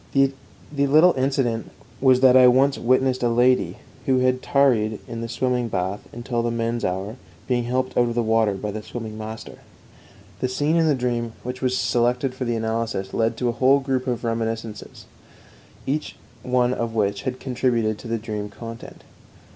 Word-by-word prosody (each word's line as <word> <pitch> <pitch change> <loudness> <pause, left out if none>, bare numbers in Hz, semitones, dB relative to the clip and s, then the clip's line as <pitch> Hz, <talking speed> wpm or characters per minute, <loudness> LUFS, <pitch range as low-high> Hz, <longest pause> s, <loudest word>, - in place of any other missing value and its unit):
The 135 0 +3 0.4
little 150 +5 +5
incident 130 -4 -1 0.3
was 130 -1 +5
that 130 -1 +6
I 130 -1 +8
once 135 +3 +4
witnessed 130 +1 +2
a 120 - +2
lady, 125 +2 +2 0.3
who 130 - +3
had 130 0 +2
tarried 115 -6 +2
in 115 -1 -6
the 115 - -5
swimming 125 0 0
bath 95 -1 -2
until 120 0 -3
the 120 - -1
men's 115 0 -2
hour, 95 +6 -3 0.3
being 120 -2 0
helped 130 +2 -1
out 120 - +3
of 115 - -4
the 120 - +1
water 110 -2 +2
by 105 +2 -4
the 110 +1 -5
swimming 110 0 -7
master. 110 0 -8 0.8
The 130 - -1
scene 145 +5 0
in 165 -1 +3
the 150 - +3
dream 120 -2 -2
which 125 +1 -6
was 130 -1 +1
selected 125 +2 +1
for 130 0 -4
analysis 115 -4 -2
led 115 0 0
to 125 0 0
a 120 - -5
whole 135 +2 +5
group 135 -1 -2
of 125 -1 -2
reminiscences, 115 -2 -4 0.8
each 150 +3 -2 0.3
one 125 0 +1
of 115 -2 -3
which 100 -2 0
had 130 -2 -4
contributed 120 -4 0
to - - -9
the 115 0 -1
dream 105 -2 -5
content. 115 +2 -10
120 Hz, 180 wpm, -23 LUFS, 115-130 Hz, 0.8 s, I